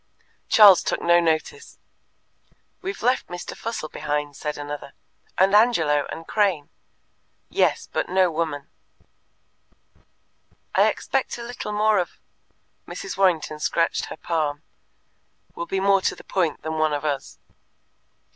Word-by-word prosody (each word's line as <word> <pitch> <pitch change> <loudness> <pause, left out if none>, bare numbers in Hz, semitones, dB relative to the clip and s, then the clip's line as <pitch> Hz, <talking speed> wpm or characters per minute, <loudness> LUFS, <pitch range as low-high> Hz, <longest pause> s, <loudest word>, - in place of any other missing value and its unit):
Charles 205 -5 +8
took - - -1
no 170 0 +4
notice. 170 - -2 1.0
"We've 390 +2 -5
left 250 +2 +1
Mr. 175 0 -7
Fussell 225 -8 -5
behind," 150 -1 -3
said 150 +1 -4
another; 145 -1 -7 0.4
"and 190 +2 +4
Angelo, 165 -10 +3
and 165 - -7
Crane." 190 -9 +1 0.8
"Yes, - - +1
but - - -1
no 185 -1 +3
woman." 155 -3 -3 2.1
"I - - +5
expect 270 -2 -1
a 235 - -7
little 225 -3 -5
of" 210 -4 +2 0.7
Mrs. 385 - -6
Warrington 165 -5 +1
scratched 165 +2 0
her - - -9
palm 155 -3 -2 0.4
" - - -42
will 170 - -5
be 195 - -1
more 195 0 +3
to - - 0
the - - -14
point 170 -5 -1
than 160 0 -3
one 155 -1 +2
of 145 +1 -3
us!" 140 -3 -3
170 Hz, 130 wpm, -23 LUFS, 150-205 Hz, 2.1 s, Charles